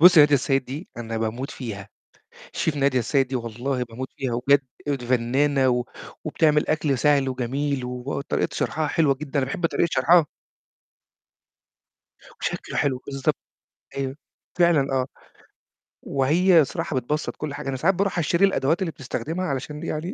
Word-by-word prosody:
بُص 180 Hz, 0 st, +9 dB
نادية 145 Hz, -1 st, +7 dB
السيد 135 Hz, 0 st, +1 dB
دي 145 Hz, +8 st, -7 dB
أنا 115 Hz, -1 st, -4 dB
باموت 115 Hz, +5 st, -3 dB
فيها. 105 Hz, -5 st, -7 dB, 0.6 s
شيف 155 Hz, -2 st, -1 dB
نادية 135 Hz, -2 st, +2 dB
السيد 130 Hz, +2 st, +1 dB
دي 130 Hz, -, -1 dB
والله 125 Hz, +3 st, -3 dB
باموت 125 Hz, +3 st, -7 dB
فيها، 130 Hz, -3 st, -2 dB
وبجد 140 Hz, +3 st, +3 dB, 0.3 s
أيوه 140 Hz, -2 st, +1 dB
فنانة 130 Hz, +3 st, +2 dB
و 125 Hz, 0 st, +1 dB, 0.4 s
وبتعمل 150 Hz, -1 st, +2 dB
أكل 150 Hz, -4 st, +1 dB
سهل 140 Hz, -2 st, +3 dB
وجميل 130 Hz, +2 st, -2 dB
وطريقة 125 Hz, +3 st, -2 dB
شرحها 155 Hz, 0 st, -1 dB
حلوة 150 Hz, -4 st, +3 dB
جدًا، 140 Hz, 0 st, -4 dB
أنا 130 Hz, -, +1 dB
باحب 165 Hz, +5 st, -1 dB
طريقة 170 Hz, +1 st, +1 dB
شرحها. 160 Hz, +4 st, +5 dB, 2.1 s
وشكله -, -, -3 dB
حلو 135 Hz, -3 st, +1 dB
بالضبط. 135 Hz, -1 st, -1 dB, 0.6 s
أيوه، 135 Hz, 0 st, -3 dB, 0.4 s
فعلًا، 160 Hz, -6 st, +3 dB
آه. 130 Hz, -1 st, +1 dB, 1.0 s
وهي 165 Hz, +6 st, +4 dB
الصراحة 150 Hz, +2 st, -2 dB
بتبسط 150 Hz, +5 st, -2 dB
كل 150 Hz, -2 st, -5 dB
حاجة. 140 Hz, -, -5 dB
أنا 135 Hz, -, -2 dB
ساعات 175 Hz, +8 st, +2 dB
باروح 195 Hz, -1 st, 0 dB
أشتري 170 Hz, +4 st, +3 dB
الأدوات 165 Hz, -2 st, +1 dB
اللي 170 Hz, -, -1 dB
بتستخدمها 160 Hz, +6 st, -4 dB
علشان 150 Hz, +2 st, -4 dB
يعني 170 Hz, +4 st, -3 dB
140 Hz, 150 wpm, -24 LUFS, 130-155 Hz, 2.1 s, بُص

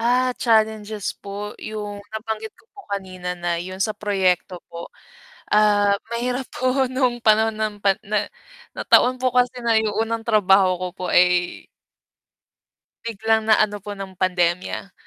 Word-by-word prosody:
Ah, 250 Hz, +2 st, +2 dB
challenges 220 Hz, -3 st, +1 dB
po, 205 Hz, +1 st, -6 dB
'yung 210 Hz, -1 st, -6 dB
nabanggit 220 Hz, 0 st, -5 dB
ko -, -, -25 dB
po 410 Hz, -, -12 dB
kanina 185 Hz, -2 st, -5 dB
na 175 Hz, -1 st, -2 dB
'yun 185 Hz, +1 st, -7 dB
sa 215 Hz, +1 st, 0 dB
proyekto 185 Hz, -3 st, 0 dB, 0.2 s
po. 170 Hz, 0 st, -7 dB, 0.6 s
Ah, 205 Hz, -1 st, +4 dB, 0.2 s
mahirap 245 Hz, +2 st, -2 dB
po 255 Hz, +1 st, +1 dB
nung 255 Hz, -1 st, 0 dB
panahon 220 Hz, 0 st, +3 dB
ng 215 Hz, -1 st, -1 dB
pan 195 Hz, -1 st, +3 dB
na 210 Hz, 0 st, -1 dB, 0.5 s
nataon 255 Hz, +1 st, +3 dB
po 255 Hz, 0 st, +1 dB
kasi 250 Hz, 0 st, +2 dB
na 235 Hz, -2 st, +1 dB
'yung 220 Hz, -1 st, +2 dB
unang 225 Hz, 0 st, -1 dB
trabaho 195 Hz, -4 st, +3 dB
ko 185 Hz, -, -2 dB
po 185 Hz, -, -8 dB
ay 180 Hz, 0 st, +2 dB, 1.4 s
biglang 220 Hz, 0 st, 0 dB
na 215 Hz, -, +6 dB
ano 205 Hz, -1 st, 0 dB
po 205 Hz, -, -6 dB
ng 190 Hz, -1 st, -8 dB
pandemya. 180 Hz, +1 st, -1 dB
210 Hz, 145 wpm, -22 LUFS, 190-230 Hz, 1.4 s, na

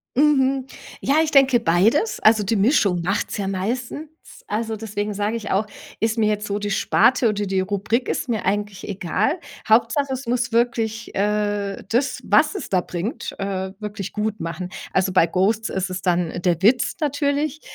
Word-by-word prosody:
Mhm. 270 Hz, -2 st, +3 dB, 0.3 s
Ja, 275 Hz, -, +1 dB
ich 315 Hz, -, -2 dB
denke 265 Hz, -3 st, +5 dB
beides. 225 Hz, -, +2 dB
Also, 215 Hz, -1 st, +4 dB
die 210 Hz, +3 st, 0 dB
Mischung 200 Hz, -, +3 dB
macht's 195 Hz, +5 st, -1 dB
ja 195 Hz, -, -2 dB
meistens. 240 Hz, +10 st, -3 dB, 0.4 s
Also, 220 Hz, +1 st, -2 dB
deswegen 210 Hz, -1 st, -4 dB
sage 205 Hz, +2 st, -1 dB
ich 215 Hz, -2 st, -6 dB
auch, 200 Hz, +3 st, +1 dB, 0.3 s
ist 225 Hz, +1 st, 0 dB
mir 220 Hz, -2 st, +3 dB
jetzt 210 Hz, 0 st, -1 dB
so 205 Hz, 0 st, -2 dB
die 205 Hz, 0 st, -3 dB
Sparte 240 Hz, +4 st, +3 dB
oder 205 Hz, -1 st, -1 dB
die 190 Hz, 0 st, +1 dB
Rubrik, 210 Hz, +5 st, -1 dB
ist -, -, -2 dB
mir 225 Hz, -3 st, -1 dB
eigentlich 205 Hz, 0 st, -2 dB
egal. 205 Hz, -, -1 dB, 0.3 s
Hauptsache, 235 Hz, +5 st, +3 dB
es 260 Hz, -1 st, -6 dB
muss 240 Hz, 0 st, 0 dB
wirklich, 230 Hz, -1 st, -1 dB
äh, 205 Hz, -1 st, -1 dB
das, 260 Hz, +3 st, 0 dB
was -, -, +4 dB
es 395 Hz, -, -6 dB
da 185 Hz, -2 st, +2 dB
bringt, 185 Hz, -, -5 dB
äh, 190 Hz, -1 st, -3 dB
wirklich 210 Hz, -2 st, -5 dB
gut 210 Hz, 0 st, -2 dB
machen. 170 Hz, +2 st, -5 dB, 0.2 s
Also, 190 Hz, 0 st, +1 dB
bei 185 Hz, -, +5 dB
„Ghosts“ 205 Hz, +6 st, +1 dB
ist 190 Hz, 0 st, -2 dB
es 185 Hz, 0 st, -4 dB
dann 175 Hz, -2 st, 0 dB
der 175 Hz, -2 st, +1 dB
Witz 235 Hz, +5 st, +3 dB
natürlich. 290 Hz, +1 st, 0 dB
210 Hz, 175 wpm, -22 LUFS, 195-245 Hz, 0.4 s, denke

